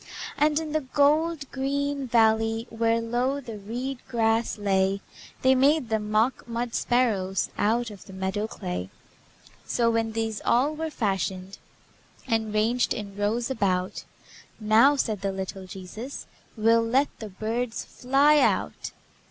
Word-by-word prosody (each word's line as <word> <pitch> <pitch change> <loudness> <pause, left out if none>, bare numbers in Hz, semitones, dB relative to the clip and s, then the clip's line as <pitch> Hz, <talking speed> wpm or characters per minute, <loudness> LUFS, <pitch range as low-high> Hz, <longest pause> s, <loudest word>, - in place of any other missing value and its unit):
And 300 +1 +2
in 315 -1 -5
the 310 0 0
gold 295 +3 +2
green 280 0 -2
valley, 225 -1 +3
Where 230 0 +1
low 245 +4 -1
the 230 -6 -8
reed 245 +6 -4
grass 225 -2 +1
lay, 195 -1 +1 0.4
They 260 0 +6
made 270 0 +3
them 215 -1 -1
mock 220 +5 +1
mud 235 0 -3
sparrows 205 -7 +1
Out 230 +2 +1
of 200 -3 -12
the - - -12
meadow 190 +3 -2
clay. 90 - -5 0.8
So, 235 -1 +2
when 225 -1 0
these 225 -1 -2
all 265 +6 +2
were 320 +1 -3
fashioned, 195 - -2 0.7
And 220 -1 0
ranged 225 +4 +1
in 200 -2 -6
rows 225 +5 -1
about, 185 -6 -1 0.6
"Now," 225 +6 +5
said 215 -7 -1
the 195 -1 -1
little 190 0 -6
Jesus, 195 +8 -8 0.3
"We'll 225 +1 +4
let 260 +5 +2
the 220 - -6
birds 225 +4 -3
fly 280 +4 +3
out." - - 0
230 Hz, 140 wpm, -26 LUFS, 210-260 Hz, 0.8 s, They